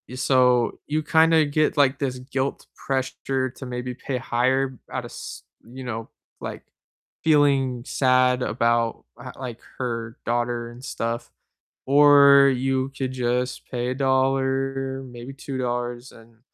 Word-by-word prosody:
so, 125 -2 +3
you 155 +1 -1
kinda 160 0 +4
get, 155 +1 +1
like, 140 -1 +3
this 130 -3 -2
guilt 135 +1 -3
pressure 130 0 -2
to 130 +1 -10
maybe 125 0 -4
pay 135 - -5
higher 130 +1 0
out - - -3
of - - -10
s - - -8 0.2
you 130 +3 -10
know, 115 -2 -5 0.3
like, - - -6 0.6
feeling 140 -5 +3
sad 130 -1 +3
about 115 -1 0 0.2
h - - -8
like, 125 -3 -6 0.2
her 115 -2 -4
daughter 120 0 -1
and 125 +3 -11
stuff. 115 0 -4 0.5
Or, 140 0 +7
you 130 +1 0
could 130 -1 -2
just 125 0 -1
pay 125 0 -2
a - - -3
dollar, 135 0 0
maybe 125 0 -9
$2 125 -2 -4
and 115 0 -18
130 Hz, 135 wpm, -24 LUFS, 120-135 Hz, 0.6 s, Or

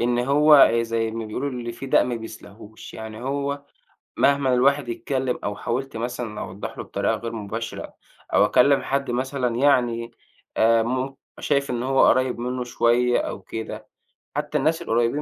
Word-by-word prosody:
إن 120 0 +1
هو 145 +3 +6
زي 115 -1 -1
ما 115 0 -5
بيقولوا: 125 +6 -3
"اللي 120 -2 -5
في 120 +4 -8
داء - - +4
ما 125 -1 -2
بيسلاهوش." 110 0 -10
يعني 110 +1 -8
هو 140 +1 -3 0.5
مهمًا 140 -2 +3
الواحد 140 +1 +2
يتكلّم 130 +1 -2
أو 105 0 -2
حاولت 130 +2 -3
مثلًا 120 -2 -4
أوضّح 95 +2 -7
له - - -4
بطريقة - - -1
غير 115 0 -6
مباشرة 115 +1 -6 0.4
أو - - +6
أكلّم 140 +2 +4
حد 140 -1 -1
مثلًا 125 -1 -1
يعني 120 -4 +2 0.5
آآ 115 0 +4
مم 130 +3 -2 0.2
شايف 140 -2 0
إن 120 -1 -2
هو 135 +1 +4
قُريّب 130 -2 +2
منّه 125 +1 -3
شوية 120 0 +2
أو 100 - -4
كده، 110 +4 -7 0.5
حتّى 150 +1 -1
الناس 160 +2 +1
القريّبين 120 +1 0
125 Hz, 160 wpm, -23 LUFS, 115-135 Hz, 0.5 s, هو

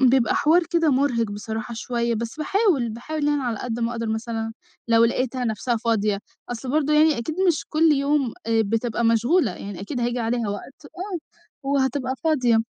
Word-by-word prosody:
فبيبقى 255 -2 +4
حوار 330 +4 +4
كده 330 -2 +3
مُرهِق 255 -5 +1
بصراحة 220 +2 -5
شويّة. 235 0 -1
بس 230 +3 -4
باحاول، 345 - +2
باحاول 290 +7 -4
يعني 290 -2 +1
على 235 -4 -2
قد 240 -1 -4
ما 235 +1 0
أقدَر 230 -1 -3
مثلًا 225 0 -3 0.4
لو 230 0 +5
لقيتها 255 +2 0
نَفسها 235 +2 -1
فاضية، 215 -3 +1 0.3
أصل 245 +1 -5
برضه 300 0 +1
يعني 305 -3 +4
أكيد 270 +7 -3
مش 325 - +1
كل 315 0 +4
يوم، 280 -3 +1
آآ 225 -1 +3
بتبقى 225 +2 -1
مشغولة، 235 +10 +3
يعني 195 -3 -7
أكيد 245 +6 -4
هييجي 240 +1 0
عليها 230 -1 -1
وقت 235 +8 -7
آه 370 +4 -5 0.5
وهتبقى 265 -1 0
فاضية، 255 -8 +3
240 Hz, 175 wpm, -23 LUFS, 230-290 Hz, 0.5 s, لو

